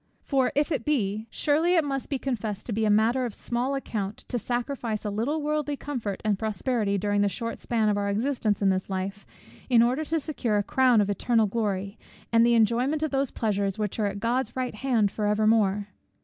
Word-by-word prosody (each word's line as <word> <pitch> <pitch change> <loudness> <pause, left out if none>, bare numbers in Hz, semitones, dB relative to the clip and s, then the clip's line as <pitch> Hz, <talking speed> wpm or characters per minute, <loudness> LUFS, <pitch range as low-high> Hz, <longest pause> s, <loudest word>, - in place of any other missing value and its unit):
For 265 -3 +1
if 295 +3 +1
it 270 -7 -1
be, 220 -6 -1
surely 320 +8 +2
it 330 - +4
must 275 -2 -3
be 275 - 0
confessed 220 -6 -3
to - - -4
be 220 +1 0
a - - +2
matter 225 +5 +3
of 235 -4 -4
small 245 +3 -2
account 215 -6 -4
to 245 - -1
sacrifice 240 -1 -3
a 210 - -1
little 275 +9 -1
worldly 300 -1 -1
comfort 240 -10 -4
and 205 -2 +1
prosperity, 220 -1 -1
during 205 +1 +1
the 205 - +3
short 230 +5 -4
span 225 -3 0
of 205 -1 +2
our 200 0 -1
existence 215 -1 0
in 195 - +4
this 190 0 -1
life, 195 +2 -4 0.4
in 235 -2 +6
order 255 +6 +1
to 325 +2 0
secure 260 -8 -1
a 205 - +1
crown 250 0 +4
of 205 - 0
eternal 225 +2 +2
glory, 200 -1 -2 0.3
and 230 0 +6
the 235 0 +4
enjoyment 245 +7 +2
of 310 - -1
those 270 -1 0
pleasures 200 -3 -1
which 210 0 -3
are 210 - +2
at 200 0 -4
God's 240 +5 -1
right 255 -1 -2
hand 220 -3 +1
for 210 -1 -2
evermore! 210 -1 +2
230 Hz, 210 wpm, -26 LUFS, 205-265 Hz, 0.4 s, in